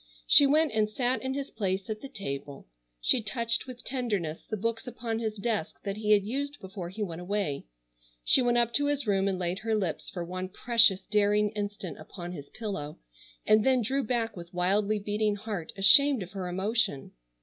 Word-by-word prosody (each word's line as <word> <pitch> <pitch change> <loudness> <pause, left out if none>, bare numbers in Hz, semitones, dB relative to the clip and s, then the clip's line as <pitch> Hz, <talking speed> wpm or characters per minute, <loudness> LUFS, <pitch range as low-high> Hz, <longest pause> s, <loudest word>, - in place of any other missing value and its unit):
She 280 - +7
went 305 +2 +3
and 215 -1 +1
sat 245 +4 -1
in 265 0 -3
his 280 0 -4
place 190 -3 -2
at 215 -1 -5
the 275 - -8
table, 140 - -6 0.3
she 145 - +3
touched 230 +3 -1
with 250 -1 -9
tenderness 205 - -3
the 215 - -3
books 230 +4 -3
upon 230 -2 -4
his 220 -2 -3
desk 215 -5 -3
that 200 0 -4
he 215 0 +3
had 205 -1 +4
used 280 +7 -4
before 190 -2 -7
he 210 +4 -4
went 170 -3 -5
away, 185 - -2 0.6
she 255 - +4
went 240 -1 +2
up 235 -1 +2
to 285 +4 +2
his 290 -2 -1
room 195 -2 +1
and 190 -1 0
laid 180 +1 -2
her 220 +1 -1
lips 190 -7 -2
for 175 -2 -5
one 185 +1 -5
precious 225 -2 +4
daring 210 0 +2
instant 205 -4 -5
upon 175 -2 -8
his 145 -5 -9
pillow, 195 -10 -5 0.5
and 215 0 +5
then 255 -1 +3
drew 270 +5 0
back 225 -1 -1
with 175 0 -10
wildly 200 +4 +1
beating 210 +1 -1
heart 205 -5 -5
ashamed 230 +5 +7
of 180 - -12
her 190 -3 -5
emotion. 195 - -1
210 Hz, 195 wpm, -28 LUFS, 190-235 Hz, 0.6 s, She